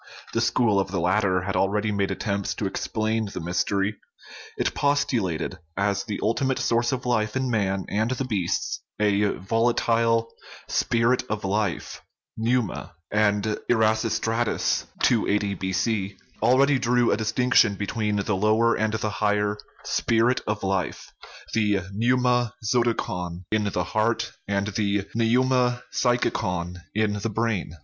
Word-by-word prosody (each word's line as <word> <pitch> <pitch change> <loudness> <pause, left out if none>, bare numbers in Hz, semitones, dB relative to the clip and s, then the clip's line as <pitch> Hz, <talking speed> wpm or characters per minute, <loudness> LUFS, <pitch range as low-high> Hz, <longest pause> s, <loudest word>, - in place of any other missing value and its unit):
The - - +1
school 110 -5 +2
of 95 - -1
the 95 -1 -2
latter 95 +1 +2
had 100 +2 -3
already 105 +2 +1
made 100 -1 0
attempts 100 -3 -2
to 105 - -3
explain 110 +2 -1
the - - -5
mystery; 95 +4 -1 0.6
it - - 0
postulated 110 - 0 0.2
as 100 0 0
the 105 -3 -4
ultimate 130 +4 +1
source 120 +1 +1
of 130 -2 -3
life 110 -3 0
in 130 -1 0
man 100 -3 0
and 110 +3 0
the 130 +1 -2
beasts 100 -8 -1 0.2
a 105 0 +3
volatile 115 +2 +1 0.2
" - - -15
spirit 120 +2 +2
of 105 -2 -3
life" 100 -2 -2 0.3
(Pneuma); 115 -6 -1 0.2
and 105 -1 +2 0.3
Erasistratus 115 0 +1 0.2
(280 105 -3 +2
B.C.) 95 +1 -1 0.2
al 120 +4 +4
ready 140 0 +4
drew 120 -1 +2
a - - +2
distinction 110 -1 +3
between 105 +1 -2
the 100 0 0
lower 110 +4 +3
and 110 0 0
the 110 0 -1
higher 105 0 +2 0.2
" - - -25
spirit 115 +2 +1
of 105 -1 -2
life," 95 -2 -2 0.4
the 105 -3 +2
pneuma 125 +1 +2 0.2
zoticon 95 -7 -1
in 110 -1 +1
the 90 -3 -1
heart 110 +5 0 0.2
and 100 0 0
the 100 -1 0
pneuma 125 +2 +2
psychicon 90 -8 0 0.2
in 110 -1 +1
the 115 - -2
brain. 110 -5 -1
110 Hz, 140 wpm, -25 LUFS, 100-115 Hz, 0.6 s, al